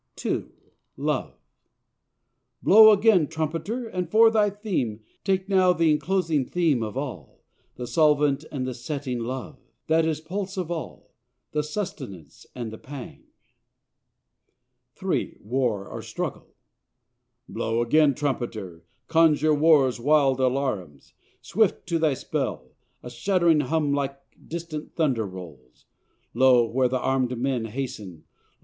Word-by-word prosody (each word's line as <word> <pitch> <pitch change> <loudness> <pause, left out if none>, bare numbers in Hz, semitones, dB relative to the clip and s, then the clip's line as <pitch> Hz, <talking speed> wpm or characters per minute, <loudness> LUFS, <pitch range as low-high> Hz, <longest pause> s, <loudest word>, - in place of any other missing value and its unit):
[II. - - -1 0.5
"LOVE"] - - -2 1.3
"Blow 220 +1 +9
again, 205 -6 +4
trumpeter! 165 - -3
and 180 -5 -4
for 225 +3 +6
thy 210 -2 +3
theme 185 - -3 0.2
Take 190 -1 0
now 185 -2 +4
the 165 -2 +3
enclosing 165 -2 +1
theme 165 -8 +1
of 110 +2 -4
all 125 - -7 0.3
the 125 - -6
solvent 150 -1 +2
and 130 -3 -3
the 130 - -3
setting; 130 0 -4
Love, 130 +4 -5 0.3
that 160 +1 +3
is 160 -1 -1
pulse 190 +4 -5
of 175 -2 -3
all 165 -2 -6 0.4
the 150 - 0
sustenance 150 - -7
and 120 -3 -5
the 110 - -9
pang;" 135 -2 -10 1.7
[III. - - -2
"WAR 115 -3 -1
OR - - -7
STRUGGLE"] - - -5 1.0
"Blow 115 +1 -1
again, 145 +3 +4
trumpeter 110 - -4 0.2
conjure 155 -2 +4
war's 145 -5 +4
wild 135 0 +3
alarums. 125 - -2 0.3
"Swift 215 -1 +1
to 165 -1 +1
thy 155 -4 +2
spell, 65 - -4 0.3
a 125 - -7
shuddering 170 +5 +2
hum 150 0 0
like 140 -1 -2 0.3
distant 165 -2 -6
thunder 130 -10 +1
rolls; 80 -10 -12 0.5
Lo! 125 -1 +5
where 130 +2 +1
the 130 +1 -1
arm'd 130 -1 0
men 125 -2 -1
hasten 110 - -6
Lo! - - -42
145 Hz, 130 wpm, -25 LUFS, 120-165 Hz, 1.7 s, Blow